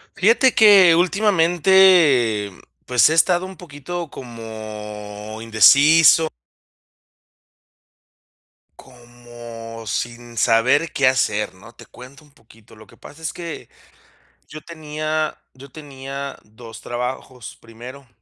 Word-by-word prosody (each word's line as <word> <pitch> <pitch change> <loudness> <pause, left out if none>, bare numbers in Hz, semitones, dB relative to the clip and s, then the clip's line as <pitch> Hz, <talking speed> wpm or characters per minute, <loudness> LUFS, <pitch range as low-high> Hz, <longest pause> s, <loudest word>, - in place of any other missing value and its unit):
Fíjate 230 +6 +2
que 195 -6 +6
últimamente, 175 - +2 0.3
pues, 125 +1 +3
he - - 0
estado 175 +2 +1
un 190 0 -11
poquito 170 +1 -8
como 110 -3 -10
indeciso 145 +9 +5 2.5
como 120 -2 -13
sin 120 +3 -6
saber 130 +9 +1
qué 140 - +1
hacer, 105 -7 -1
¿no? 105 +5 -17
Te - - -17
cuento 130 +4 -15
un 150 - -23
poquito. 115 -5 -22
Lo 110 0 -16
que - - -21
pasa 160 +2 -16
es 160 - -4
que 170 -2 -9 0.8
yo 155 - -10
tenía 155 -1 -5
yo 135 +1 -15
tenía 140 -1 -9
2 115 +1 -14
trabajos 125 -1 -7
primero. 125 +4 -13
130 Hz, 105 wpm, -19 LUFS, 115-160 Hz, 2.5 s, que